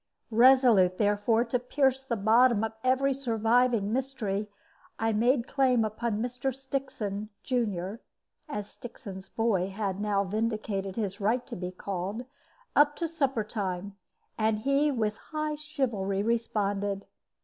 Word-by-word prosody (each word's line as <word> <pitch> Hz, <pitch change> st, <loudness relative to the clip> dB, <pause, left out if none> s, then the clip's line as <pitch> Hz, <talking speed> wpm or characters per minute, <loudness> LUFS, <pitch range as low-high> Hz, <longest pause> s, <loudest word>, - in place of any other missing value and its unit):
Resolute, 230 Hz, -6 st, +6 dB
therefore, 210 Hz, +3 st, +2 dB
to 250 Hz, +1 st, 0 dB
pierce 265 Hz, +1 st, +1 dB
the 265 Hz, -3 st, -2 dB
bottom 225 Hz, +2 st, +4 dB
of 225 Hz, 0 st, -2 dB
every 260 Hz, +2 st, +3 dB
surviving 230 Hz, -3 st, +2 dB
mystery, 230 Hz, -6 st, -2 dB, 0.5 s
I 225 Hz, 0 st, +1 dB
made 235 Hz, +3 st, +2 dB
claim 255 Hz, -4 st, +3 dB
upon 215 Hz, 0 st, -2 dB
"Mr. 250 Hz, +2 st, -2 dB
Stixon, 260 Hz, -7 st, -4 dB
junior" 210 Hz, -4 st, -2 dB, 0.5 s
as 210 Hz, -7 st, -4 dB
"Stixon's 200 Hz, -6 st, -9 dB
boy" 205 Hz, -5 st, +1 dB
had 195 Hz, -1 st, -3 dB
now 205 Hz, -1 st, +1 dB
vindicated 210 Hz, -2 st, -2 dB
his 205 Hz, -3 st, -3 dB
right 235 Hz, +5 st, +1 dB
to -, -, -7 dB
be 180 Hz, 0 st, -4 dB
called, 195 Hz, +5 st, -4 dB, 0.5 s
up 290 Hz, 0 st, +5 dB
to 335 Hz, -, -2 dB
supper 275 Hz, -8 st, 0 dB
time 200 Hz, -2 st, -4 dB, 0.4 s
and 215 Hz, -1 st, +1 dB
he 275 Hz, +4 st, +2 dB
with 220 Hz, -6 st, -1 dB
high 305 Hz, -1 st, -3 dB
chivalry 240 Hz, -11 st, -2 dB
responded. 205 Hz, -3 st, -1 dB
225 Hz, 130 wpm, -29 LUFS, 200-255 Hz, 0.5 s, Resolute